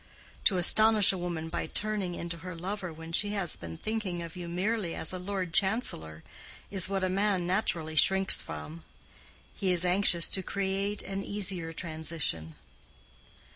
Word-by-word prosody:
To 190 - +3
astonish 215 +3 +7
a - - -4
woman 170 -2 -5
by - - -4
turning 205 -4 -3
into 170 0 -6
her 180 +1 -9
lover 185 +1 -5
when 165 +1 -11
she 205 +4 0
has 195 -5 +3
been 80 -1 -9
thinking 205 -6 -4
of 165 -1 -10
you 175 -1 -7
merely 190 +1 -2
as 160 - +2
a 185 - -5
Lord 185 -2 -5
Chancellor 80 - 0 0.5
is 190 -2 +1
what 195 -1 -2
a - - +1
man 195 -1 0
naturally 175 -4 -2
shrinks 190 +4 +5
from: 75 +2 -9 0.7
he 190 -2 -1
is 180 0 +1
anxious 180 -2 +3
to 190 - -1
create 195 +2 -3
an 195 0 -5
easier 190 -5 -1
transition. 155 - -4
180 Hz, 160 wpm, -28 LUFS, 165-195 Hz, 0.7 s, astonish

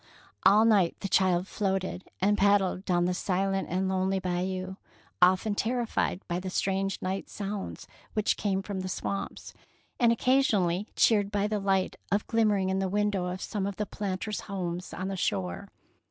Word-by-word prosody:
'^ - - -33 0.4
All 215 +2 +6
night 200 -7 +4
the 195 - -2
child 185 -1 +3
floated 190 -3 -2
and 205 +3 +3
paddled 200 -2 +2
down 175 -2 +2
the 180 - +1
silent 195 +1 0
and 185 +2 0
lonely 190 0 +1
Bayou, 185 +1 -2 0.4
often 185 +4 +4
terrified 230 -3 -1
by 175 +1 -1
the 185 0 -5
strange 195 +1 -1
night 190 +1 -3
sounds 200 -1 -5 0.3
which 215 -1 +2
came 195 -2 -1
from 200 -1 -4
the 185 0 -4
swamps, 195 +1 -4 0.5
and 235 -1 +5
occasionally 215 -7 +2
cheered 205 -3 +4
by 205 -1 0
the 210 0 0
light 195 -1 0 0.3
glimmering 210 -4 +2
in 190 0 0
the 190 -1 0
window 205 -2 0
of 180 +1 -4
some 200 -3 -2
of 200 - -4
the 210 - -2
planters' 200 +1 -3
homes 180 -2 -4
on 185 - -4
the 195 - -3
shore. 95 - -2
195 Hz, 170 wpm, -28 LUFS, 185-205 Hz, 0.5 s, All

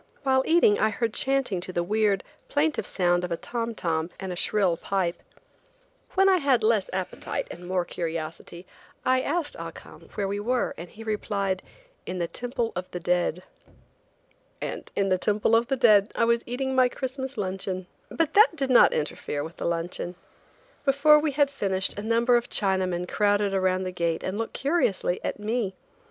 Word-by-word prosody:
While 265 -1 +3
eating 320 -11 +5
I 220 - +3
heard 225 +1 -2
chanting 265 -10 0
to 185 - -5
the 175 -1 -1
weird, 205 0 +1 0.3
plaintive 300 +1 0
sound 175 -1 +1
of 180 - -4
a 170 - 0
tom 235 +2 -4
tom 165 -3 -1
and 190 -1 -4
a - - -6
shrill 185 -1 +1
pipe. 180 0 -2 0.9
When 385 0 +5
I 380 -1 +5
had 275 -8 +2
less 215 -3 +2
appetite 185 -1 -3
and 175 +1 -9
more 180 -1 0
curiosity, 165 +1 -5 0.4
I 255 0 +3
asked 295 +2 -1
Ah - - -5
Cum - - -14
where 200 -2 -1
we 200 +1 -2
were, 245 +4 0
and 170 +2 -9
he 225 - -11
replied: 200 -3 -1 0.5
"in 185 - -3
the 170 -1 -1
Temple 240 +2 -3
of 180 +1 -4
the 180 - -5
Dead." 180 0 0 1.2
And - - -5
in 195 -1 +1
the 185 -1 +2
Temple 210 +3 +2
of 230 +1 +3
the 270 - 0
Dead 210 -4 +5
I 230 - +3
was 235 0 +2
eating 265 +2 -2
my 255 -1 +4
Christmas 265 +1 -5
luncheon. 185 -1 -3 0.2
But 330 -3 0
that 425 -3 +6
did 270 -4 -1
not 245 - +7
interfere 150 -1 -2
with 160 +2 -9
the - - -4
luncheon. 170 +1 -3 0.7
Before 290 +2 +5
we 300 -1 -1
had 285 0 +2
finished 195 -6 -1
a - - -3
number 230 +3 +3
of 240 - -3
Chinaman 185 -3 0
crowded 205 0 +1
around 185 -1 +1
the 185 - -3
gate 170 -2 -1
and 190 +3 -3
looked 225 - -3
curiously 270 - +1
at - - -2
me. 210 -2 -2
205 Hz, 185 wpm, -26 LUFS, 180-250 Hz, 1.2 s, not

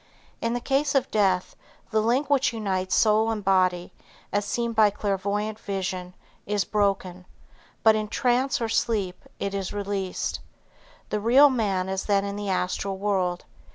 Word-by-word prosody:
In 230 +1 0
the - - -1
case 280 +3 0
of 270 - +1
death, 190 -4 +1 0.4
the 220 0 +2
link 245 +6 +1
which 275 -4 +2
unites 190 -4 -1
soul 220 0 +3
and 215 -2 -2
body, 185 -2 +1 0.4
as 205 0 +1
seen 235 +2 -2
by 215 -1 +5
clairvoyant 205 +2 -2
vision, 185 -3 -4 0.3
is 205 -1 0
broken, 190 -3 -1 0.6
but 220 -1 +6
in 215 0 -1
trance 250 +4 +1
or 230 - -1
sleep 205 -5 -1
it 200 0 -3
is 195 -2 -3
released. 200 -2 -3 0.7
The 210 - -1
real 260 +7 +6
man 200 -7 0
is 190 0 -3
then 200 -1 +2
in 200 0 -4
the 205 -1 -4
astral 190 +1 -1
world. 190 -3 -1
205 Hz, 155 wpm, -25 LUFS, 190-225 Hz, 0.7 s, but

